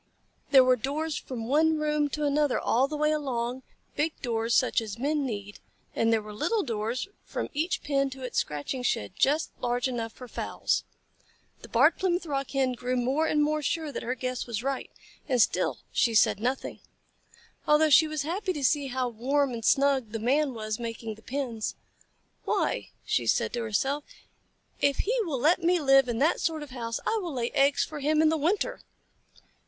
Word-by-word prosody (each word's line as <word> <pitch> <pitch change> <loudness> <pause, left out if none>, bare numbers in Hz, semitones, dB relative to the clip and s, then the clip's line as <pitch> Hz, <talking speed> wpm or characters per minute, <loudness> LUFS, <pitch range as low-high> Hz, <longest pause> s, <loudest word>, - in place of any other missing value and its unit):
There 265 -2 +8
were 255 0 +4
doors 295 +6 -2
from 230 -4 -5
one 315 +4 +3
room 300 -1 +1
to 300 +1 -2
another 290 -1 +2
all 255 +4 +2
the 300 +1 -4
way 300 +1 +2
along, 255 -4 -2 0.3
big 310 +2 -1
doors 230 -1 0
such 255 - +3
as 220 -1 -6
Men 285 +2 0
need, 205 -3 -6 0.4
and 225 0 +2
there 220 -1 +2
were 210 0 -9
little 430 - 0
doors 230 - -2 0.2
from - - -4
each 325 +5 -1
pen 275 -1 +1
to 265 0 -9
its 250 - -1
scratching 150 - -3
shed 105 - -1
just 295 +4 +2
large 245 +1 0
enough 230 -3 -3
for 250 +3 -11
fowls. - - -1 0.8
The - - -11
Barred 295 +8 +4
Plymouth 360 -1 0
Rock 275 -3 -2
Hen 270 -2 +1
grew 250 +1 -2
more 265 +6 +1
and 300 -1 +2
more 305 +1 0
sure 315 0 -2
that - - -5
her 250 +2 -2
guess 255 0 -3
was 235 -1 -3
right, 270 -1 -2 0.4
and 255 -2 +2
still 215 - +2
she 230 -2 +2
said 210 - +4
nothing, 255 +4 -2 0.9
although 300 +1 +4
she 315 +3 +7
was 310 -2 -2
happy 370 +5 -2
to 295 -4 -5
see 285 +1 +2
how 255 -1 -1
warm 260 +4 0
and 230 -1 -5
snug 270 -3 +2
the - - -1
Man 270 +4 +1
was 215 0 -4
making 230 -1 -5
the 215 - -16
pens. 245 -4 -3 0.7
"Why," - - 0 0.2
she - - 0
said - - +1
to 240 - -2
herself, 270 +7 -1 0.8
"if 280 -1 +2
he 465 +5 +1
will 290 -7 -2
let 325 +8 +3
me 350 +1 +3
live 270 -3 +5
in 235 - -1
that 305 +7 +2
sort 315 -2 -1
of 290 - -11
house 230 -2 -4
I 445 - +1
will 340 -6 -5
lay 240 -1 -1
eggs 280 -1 +3
for 305 - -6
him 305 +2 +1
in 315 - +5
the 320 - +2
winter." 345 +7 0
270 Hz, 195 wpm, -28 LUFS, 240-300 Hz, 0.9 s, There